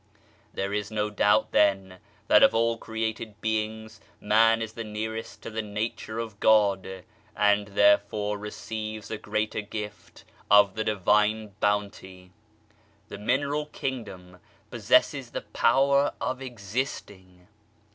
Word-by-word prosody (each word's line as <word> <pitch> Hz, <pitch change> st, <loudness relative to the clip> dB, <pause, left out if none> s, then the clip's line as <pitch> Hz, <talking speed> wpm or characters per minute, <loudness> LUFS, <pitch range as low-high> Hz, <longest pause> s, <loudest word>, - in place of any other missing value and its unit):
There 100 Hz, +1 st, -3 dB
is 105 Hz, 0 st, -2 dB
no 105 Hz, -1 st, -2 dB
doubt 105 Hz, +1 st, +2 dB
then, 95 Hz, -2 st, +2 dB, 0.3 s
that -, -, +6 dB
of -, -, +5 dB
all 115 Hz, 0 st, +2 dB
created 110 Hz, -1 st, -4 dB
beings 110 Hz, 0 st, -3 dB, 0.2 s
Man 115 Hz, +2 st, +4 dB
is 110 Hz, -1 st, -5 dB
the 115 Hz, -, -6 dB
nearest 110 Hz, +1 st, -6 dB
to -, -, -7 dB
the 110 Hz, +1 st, -2 dB
Nature 110 Hz, +1 st, -4 dB
of 110 Hz, -3 st, -5 dB
God, 100 Hz, -3 st, +2 dB, 0.3 s
and 105 Hz, 0 st, +2 dB
therefore 100 Hz, +1 st, +2 dB
receives 110 Hz, 0 st, -6 dB
a 110 Hz, -, -4 dB
greater 110 Hz, 0 st, -2 dB
gift 105 Hz, 0 st, -8 dB, 0.3 s
of 105 Hz, -2 st, +6 dB
the 110 Hz, -, -2 dB
Divine 105 Hz, +1 st, +1 dB
Bounty. 100 Hz, -3 st, -2 dB, 0.8 s
The -, -, -8 dB
mineral 140 Hz, +7 st, 0 dB
kingdom 95 Hz, -11 st, -6 dB, 0.3 s
possesses -, -, +2 dB
the -, -, -5 dB
power 140 Hz, +1 st, +2 dB
of 130 Hz, +1 st, -3 dB
existing. 100 Hz, -6 st, -6 dB
105 Hz, 125 wpm, -26 LUFS, 100-110 Hz, 0.8 s, that